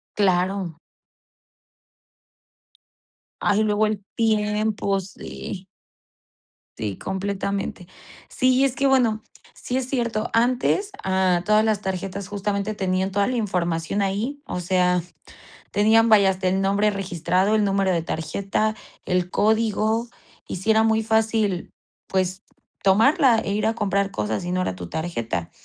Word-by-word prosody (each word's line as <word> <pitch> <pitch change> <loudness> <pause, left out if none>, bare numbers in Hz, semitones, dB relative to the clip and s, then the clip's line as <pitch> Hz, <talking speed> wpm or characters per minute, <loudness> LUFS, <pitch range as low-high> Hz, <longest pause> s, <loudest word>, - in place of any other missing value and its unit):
Claro. 185 -3 +1 2.6
Ay, 210 +1 +2
luego 210 0 +2
el 210 -2 -2
tiempo, 210 -2 +1
sí. 190 0 -8 1.1
Sí, 105 -3 -3
completamente. 195 -1 -3 0.4
Sí, 255 +1 +2
es 270 -1 +1
que, 275 - 0
bueno, 245 -5 +3 0.3
sí 250 - -3
es 260 -1 -3
cierto, 235 -4 -1
antes, 255 - +1
ah, 185 -2 +2
todas 215 +2 +3
las 215 -2 +1
tarjetas 190 0 -4
justamente 205 +1 -2
tenían 190 0 0
toda 200 +1 +2
la 255 - -1
información 180 -2 -1
ahí, 230 +10 -2
o 180 - -4
sea, 180 0 +2 0.7
tenían, 225 +2 +4
vaya, 200 -3 +6
hasta 185 0 -2
el 190 +1 +1
nombre 200 +2 +2
registrado, 190 0 0
el 215 -1 +3
número 195 -1 +1
de 170 -2 +1
tarjeta, 195 +7 -2 0.3
el 180 -1 0
código. 220 +2 +1 0.4
Y - - -4
sí 195 +5 0
era 220 0 +4
muy 220 0 +2
fácil, 220 -4 0 0.4
pues, 185 0 -1 0.4
tomarla, 225 +5 +5
e 200 - -3
ir 210 +2 0
a 225 - 0
comprar 200 -2 0
cosas, 105 - -2
y 175 - -3
no 185 0 0
era 95 - -2
tu 90 -2 -8
tarjeta. 115 - -3
200 Hz, 135 wpm, -23 LUFS, 185-220 Hz, 2.6 s, vaya